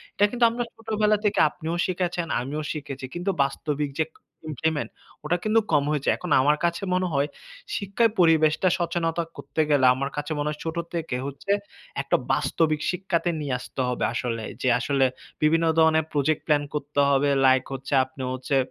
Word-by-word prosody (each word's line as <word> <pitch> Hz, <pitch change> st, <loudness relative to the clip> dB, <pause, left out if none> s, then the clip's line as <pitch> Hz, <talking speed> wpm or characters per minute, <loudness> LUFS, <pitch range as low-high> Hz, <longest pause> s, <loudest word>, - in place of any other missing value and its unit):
এটা 205 Hz, -, +4 dB
কিন্তু 245 Hz, -1 st, +3 dB
আমরা 240 Hz, +1 st, -2 dB
ছোটবেলা 215 Hz, -2 st, +1 dB
থেকে 205 Hz, -, +2 dB
আপনিও 165 Hz, +1 st, -5 dB
শিখেছেন, 175 Hz, -2 st, -2 dB
আমিও 145 Hz, +5 st, -4 dB
শিখেছি 140 Hz, -3 st, -6 dB
কিন্তু 175 Hz, +3 st, -1 dB
বাস্তবিক 145 Hz, +1 st, -2 dB
যে 160 Hz, -, +3 dB, 0.4 s
ইমপ্লিমেন্ট, 155 Hz, +1 st, -1 dB, 0.4 s
ওটা 170 Hz, +4 st, +1 dB
কিন্তু 215 Hz, +1 st, +4 dB
কম 145 Hz, -2 st, +4 dB
হয়েছে। 150 Hz, -2 st, 0 dB
এখন 180 Hz, -, -6 dB
আমার 150 Hz, +3 st, +3 dB
কাছে 170 Hz, +2 st, -1 dB
মনে 185 Hz, 0 st, +1 dB
হয়, 140 Hz, +1 st, +2 dB, 0.5 s
শিক্ষায় 205 Hz, +3 st, +1 dB
পরিবেশটা 160 Hz, 0 st, +4 dB
সচেতনতা 170 Hz, -1 st, -1 dB
করতে 160 Hz, -, -2 dB
গেলে 140 Hz, -3 st, +4 dB
আমার 140 Hz, +2 st, -2 dB
কাছে 145 Hz, +1 st, -3 dB
মনে 145 Hz, -, -1 dB
হয়, 150 Hz, 0 st, -5 dB
ছোট 160 Hz, +1 st, -3 dB, 0.2 s
থেকে 165 Hz, -6 st, -2 dB
হচ্ছে 140 Hz, +8 st, -4 dB, 0.5 s
একটা -, -, +1 dB, 0.2 s
বাস্তবিক 155 Hz, -2 st, +1 dB
শিক্ষাতে 180 Hz, -1 st, -1 dB
নিয়ে 140 Hz, -4 st, -2 dB
আসতে 130 Hz, -, -5 dB
হবে 125 Hz, -, -1 dB
আসলে। 115 Hz, -2 st, -2 dB, 0.2 s
যে 130 Hz, -, +2 dB
আসলে 135 Hz, 0 st, +2 dB, 0.4 s
বিভিন্ন 165 Hz, +2 st, +3 dB
ধরনের 160 Hz, -1 st, +4 dB
প্রজেক্ট 150 Hz, +1 st, +1 dB
প্ল্যান 150 Hz, -2 st, +3 dB
করতে 145 Hz, -1 st, -3 dB
হবে, 140 Hz, +1 st, +3 dB, 0.2 s
লাইক 130 Hz, 0 st, +4 dB
হচ্ছে 135 Hz, +1 st, -5 dB
আপনি 130 Hz, 0 st, -9 dB
হচ্ছে, 130 Hz, +2 st, -2 dB
155 Hz, 170 wpm, -25 LUFS, 140-175 Hz, 0.5 s, এটা